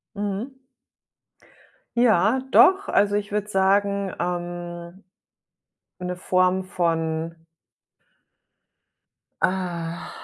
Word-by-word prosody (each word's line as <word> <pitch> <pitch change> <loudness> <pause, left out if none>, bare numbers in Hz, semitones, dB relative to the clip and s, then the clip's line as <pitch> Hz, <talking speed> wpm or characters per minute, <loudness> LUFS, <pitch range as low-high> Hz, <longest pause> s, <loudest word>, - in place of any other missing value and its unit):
Mhm. 205 +6 -3 1.4
Ja, 230 +1 +3
doch. 385 +6 +5
Also, 205 0 +3
ich 205 -1 -2
würde 210 0 -1
sagen, 200 0 +1
ähm, 175 +1 -5 1.0
'ne 180 0 -4
Form 185 +1 +1
von 165 -2 -1 2.1
ah, 170 -3 -2
185 Hz, 70 wpm, -24 LUFS, 175-205 Hz, 2.1 s, doch